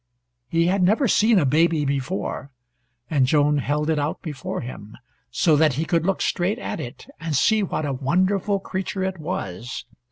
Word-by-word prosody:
He 165 0 +2
had 190 +2 +2
never 215 +9 +3
seen 215 +1 +4
a 165 - +3
baby 155 +2 +3
before, 140 +1 -3 0.6
and 135 -2 +2
Joan 145 +1 +3
held 150 +2 -1
it 160 -2 +1
out 145 +2 -2
before 150 -5 -4
him, 110 -4 -9 0.3
so 160 -3 +3
that 155 -1 +4
he 155 +6 -1
could 170 0 +1
look 195 - +1
straight 185 +5 0
at - - -5
it - - -8
and 160 -2 -3
see 220 - +3
what 175 -5 -2
a 140 - -1
wonderful 185 +9 +1
creature 190 0 -3
it 190 -1 -3
was. 120 - -5
160 Hz, 180 wpm, -23 LUFS, 145-190 Hz, 0.6 s, seen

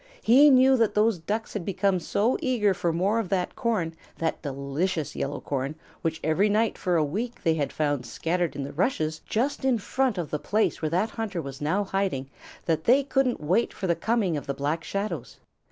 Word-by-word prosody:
He 275 +6 +7
knew 260 0 +6
that 225 -3 +2
those 210 -3 +3
Ducks 215 +7 -3
had 205 - -3
become 195 0 +1
so 215 +8 +1
eager 225 -7 +2
for 175 -2 -1
more 195 +7 +1
of 210 -6 -3
that 185 -2 -1
corn, 210 -9 -1 0.2
that 165 -1 -2
delicious 145 +3 -2
yellow 140 +1 -3
corn 140 +1 -3 0.3
which 160 0 -2
every 165 +7 +2
night 220 +2 +2
for 180 -2 0
a 160 - +3
week 220 +11 -4
they 165 -3 +3
had 150 -3 -1
found 145 -5 -1
scattered 165 +4 -1
in 140 - -3
the 140 - -6
rushes 160 - 0
just 260 +6 -1
in 260 -3 +3
front 255 +1 0
of 170 -4 -3
the 150 - -1
place 215 +7 0
where 155 - 0
that 185 +7 0
hunter 215 -6 -3
was 140 -3 -7
now 185 +8 +1
hiding, 190 -9 -2 0.3
that 160 -1 0
they 265 +4 +5
couldn't 270 - 0
wait 180 +10 +1
for 195 - -4
the 170 -2 +2
coming 205 -1 0
of 145 - -7
the 140 - -2
Black 150 +4 -2
Shadows. 200 +2 -4
185 Hz, 205 wpm, -26 LUFS, 155-225 Hz, 0.3 s, He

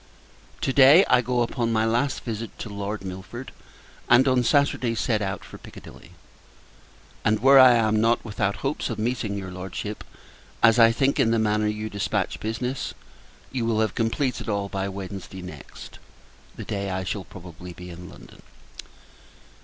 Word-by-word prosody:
To 135 - 0
day, 140 +8 +7
I 125 - +4
go 125 0 0
upon 115 -1 -2
my 110 0 +2
last 120 +5 0
visit 115 -1 -6
to 110 - -7
Lord 100 0 -5
Milford; 95 +7 -8 0.6
and, 130 +3 +6
on 130 -1 +3
Saturday, 125 -2 +1
set 110 -2 0
out 95 -1 -4
for - - -12
Piccadilly: - - -13 1.1
and 105 0 +2
where 135 +3 +7
I 130 -1 +9
am 110 -2 +2
not 115 +1 +2
without 100 -2 -1
hopes 140 +3 -2
of 115 - -4
meeting 110 -2 -2
your 95 -2 -6
Lordship; 95 +3 -6 0.6
as 115 +1 +6
I 115 0 +7
think, 135 +4 +1
in 115 - +4
the 115 - +2
manner 105 -1 +1
you 105 +1 -3
dispatch 100 -2 -2
business, 125 +4 -3 0.6
you 130 -3 -2
will 115 -1 0
have 110 0 +1
completed 120 +2 -1
all 100 -1 -2
by 95 0 -3
Wednesday 95 -1 -7
next, 90 - -11 0.6
the - - -8
day 100 -1 -3
I 95 0 -2
shall 95 +1 -4
probably 90 -1 -11
be 90 +1 -10
in 90 +1 -10
London. - - -15
110 Hz, 165 wpm, -24 LUFS, 100-120 Hz, 1.1 s, I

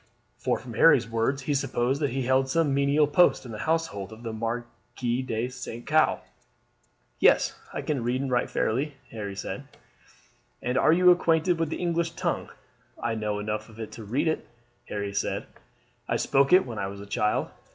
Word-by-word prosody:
For - - 0
from - - -9
Harry's - - +5
words 115 +4 0
he 145 - 0
supposed 135 0 0
that 145 - +2
he 135 +2 -2
had - - -4
held 130 0 +3
some 155 -1 +2
menial 140 +2 +3
post 145 0 +3
in 120 - -8
the 110 - -6
household 160 - -1
of 110 +2 -11
the 115 -1 -4
Marquis 120 +2 -3
de 115 -2 -2
St. 125 -2 -8
Caux. 155 0 +3 1.0
"Yes, - - +4 0.2
I - - -4
can 145 -5 -1
read 125 +2 0
and 135 -1 -2
write 120 -1 +1
fairly," 140 +6 -1 0.2
Harry 100 -3 -5
said. - - -5 0.9
"And 125 +1 -2
are 130 - +4
you 180 +2 +6
acquainted 170 0 +2
with 165 -2 0
the - - -3
English 170 -1 -1
tongue?" - - -2 0.5
"I 115 - -1
know 105 -2 -2
enough 105 +1 -3
of 110 0 -14
it 110 - -6
to 115 - -9
read 120 +10 0
it," 160 - -1 0.4
Harry 100 -1 -3
said. 100 - -1 0.6
"I - - +1
spoke 135 0 +2
it 185 +1 +7
when 115 -4 -6
I 95 - -1
was 100 0 -8
a 100 - -8
child." 105 +1 0
125 Hz, 195 wpm, -27 LUFS, 110-150 Hz, 1.0 s, it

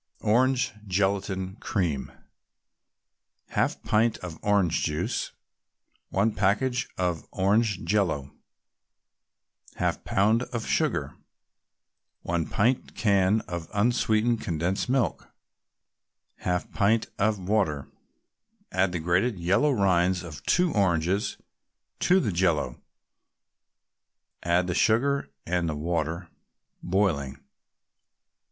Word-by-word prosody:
ORANGE 125 +4 +2
GELATIN 95 0 -1
CREAM 85 -12 -2 1.4
1/2 - - 0
pint 110 +1 +2
of 85 -3 -8
orange 100 -5 +2
juice 75 -1 -2 0.8
1 100 +4 +2
package 105 +6 +1
of 90 -4 -1
orange 100 +1 +1
Jello 85 -8 0 1.4
1/2 - - -1
pound 110 +4 +2
of 120 -3 -4
sugar - - 0 1.1
1 85 -2 -1
pint 120 +5 0
can 100 -1 +3
of 85 -2 -6
unsweetened 115 +1 +2
condensed 85 +7 -1
milk 130 -1 0 1.1
1/2 90 0 -1
pint 110 +2 +2
of 105 +1 +2
water 90 -7 0 0.8
Add 95 -1 +1
the 85 - -1
grated 90 +7 +1
yellow 95 +12 +2
rind 95 - +2
of 75 -4 -9
two 180 -2 +3
oranges 95 0 +1 0.6
to 185 +2 +4
the 115 - 0
Jello; 85 -8 0 1.6
add 85 +1 +2
the 90 - -2
sugar 125 - +2 0.2
and 85 -1 0
the 75 - -2
water, 85 +2 -2 0.5
boiling. 80 -8 0
95 Hz, 95 wpm, -27 LUFS, 85-110 Hz, 1.6 s, to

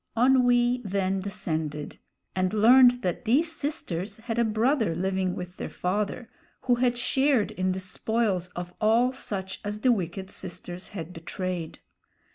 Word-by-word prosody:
Onwee 245 0 +4
then 195 -1 0
descended, 155 -6 -4 0.4
and 185 +2 0
learned 245 +3 +6
that 180 +6 -2
these 295 +9 +3
sisters 220 - -3
had 225 +1 -3
a - - +4
brother 220 - +1
living 190 +1 -1
with 180 0 -7
their - - -5
father, 205 +6 -2 0.3
who 255 - +2
had 245 0 +2
shared 265 -1 +2
in 185 0 -1
the 185 - -2
spoils 190 0 -1
of 175 0 -6
all 230 +4 +4
such 195 -7 -5
as 210 +1 -4
the 255 - +4
wicked 190 -2 -2
sisters 180 0 -7
had 180 -3 -7
betrayed. 175 0 -5
205 Hz, 145 wpm, -27 LUFS, 185-245 Hz, 0.4 s, learned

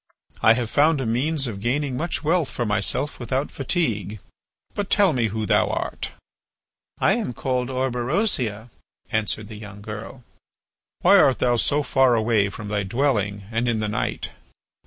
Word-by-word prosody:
I 110 - +7
have 115 -1 -2
found 150 +1 +4
a 130 - -2
means 135 +6 0
of 105 -5 -5
gaining 130 +3 0
much 160 +5 -2
wealth 160 -1 +2
for 120 - -2
myself 105 +7 0
without 130 +4 -2
fatigue. 115 - -1 0.6
But 205 -1 -3
tell 200 -5 +4
me 120 -4 +1
who 110 +1 -3
thou - - +3
art?" - - -3 0.9
"I - - +4
am 215 - -2
called 125 +1 -1
Orberosia," 125 - -1 0.4
answered 110 -1 -1
the 110 -1 -9
young 105 -1 -10
girl. 110 +4 -8 0.8
"Why 195 +3 +7
art 135 -9 +5
thou 120 -1 +2
so 145 +5 +1
far 130 -2 +3
away 110 -3 +2
from 105 +1 -8
thy 105 -1 0
dwelling 105 -2 0
and 115 +2 0
in 115 -2 +1
the 105 - -1
night?" 105 - -2
120 Hz, 160 wpm, -23 LUFS, 110-140 Hz, 0.9 s, I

